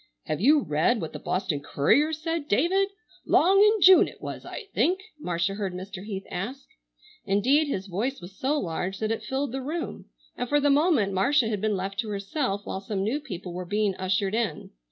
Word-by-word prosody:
"Have 155 - -3
you 290 +6 +5
read 160 +9 +1
what 160 - -5
the - - -6
Boston 180 -5 -1
Courier 275 - +2
said, 320 -1 -3
David? 375 - +2 0.3
'Long 385 +4 +4
in 425 0 +5
June 375 0 +8
it - - -12
was - - -7
I - - -7
think," 355 +10 +2 0.2
Marcia 175 - -1
heard 195 -3 -3
Mr. 190 +1 -7
Heath 195 -2 -5
ask. 250 +10 -5 0.6
Indeed 260 +11 +3
his 195 -9 -3
voice 220 +9 -2
was 180 +2 -11
so 290 +6 0
large 180 +2 -3
that 215 +1 -2
it 225 - -2
filled 265 +5 -2
the 265 +1 -3
room, 320 +5 -5 0.3
and 245 - -4
for 290 - +3
the 290 0 +3
moment 285 - +3
Marcia 240 +5 +2
had 210 -3 -2
been 215 -2 +1
left 195 +3 -4
to 225 -3 -2
herself 200 +1 -2
while 190 - -4
some 195 -1 -3
new 235 +8 0
people 180 - -7
were 180 +1 -4
being 205 +2 0
ushered 190 +1 0
in. 220 -9 -2
215 Hz, 200 wpm, -26 LUFS, 190-290 Hz, 0.6 s, June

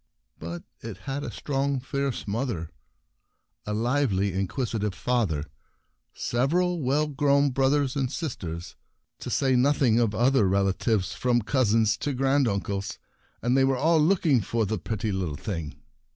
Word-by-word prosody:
But 85 +2 -6 0.2
it - - -7
had 140 +1 -3
a - - -4
strong, 140 -1 -1
fierce 135 -1 -3
mother, 100 - -2 1.0
a 105 - -1
lively 115 -4 +1
and 95 - -2
inquisitive 105 0 -2
father, 100 -13 0 0.7
several 170 +8 0
well 140 +3 +2
grown 140 -1 +2
brothers 135 +1 +1
and 135 -2 -1
sisters, 90 - -5 0.4
to - - -6
say 130 -2 +2
nothing 125 -3 +3
of 110 -3 +1
other 120 -2 +3
relatives, 100 +1 +1
from 120 -2 +1
cousins 110 -3 +2
to 145 +4 -2
grand 135 +1 +2
uncles; 100 -1 -2 0.5
and 120 +2 +2
they 135 - +4
were 135 -1 +2
all 160 +4 +3
looking 155 - +3
for 115 +2 -1
the 105 0 -2
pretty 110 +3 -3
little 90 -6 -2
thing. 80 -8 -5
125 Hz, 145 wpm, -26 LUFS, 100-140 Hz, 1.0 s, they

